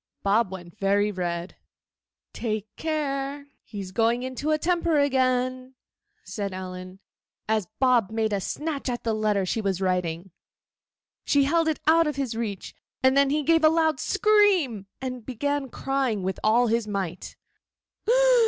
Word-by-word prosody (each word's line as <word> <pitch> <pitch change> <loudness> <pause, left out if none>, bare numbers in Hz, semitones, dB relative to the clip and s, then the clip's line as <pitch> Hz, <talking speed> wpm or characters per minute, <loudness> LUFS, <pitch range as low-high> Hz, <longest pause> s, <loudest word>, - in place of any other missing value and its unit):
Bob 200 0 +2
went 175 -3 -9
very 200 +1 +2
red. 175 -2 -4 0.8
'Take 215 -3 -2
care; 285 -2 -2 0.2
he's 195 -3 -8
going 230 +4 +1
into 260 +3 -3
a 310 - +3
temper 340 -1 +1
again,' 255 -2 +1 0.5
said 200 -4 -4
Ellen, 185 0 -7 0.5
as 215 -4 0
Bob 245 -6 +3
made 220 -1 -1
a 200 - 0
snatch 295 - -3
at 240 -1 -3
the 225 - 0
letter 210 -3 +1
she 220 +5 -1
was 195 -3 -1
writing. 180 -1 -1 0.9
She 285 -1 +3
held 330 +3 +2
it 315 - 0
out 325 +1 +5
of 300 - -2
his 270 -4 -2
reach, 215 -4 -4 0.3
and 260 0 +5
then 280 0 +4
he 300 +2 +1
gave 325 +2 +3
a 310 - +8
loud 320 -3 +2
scream 380 - +2
and 255 -2 -5
began 275 +3 -2
crying 260 -7 -1
with 190 +1 -2
all 230 +3 +4
his 230 -1 0
might. 190 -4 -4
240 Hz, 150 wpm, -25 LUFS, 200-285 Hz, 0.9 s, a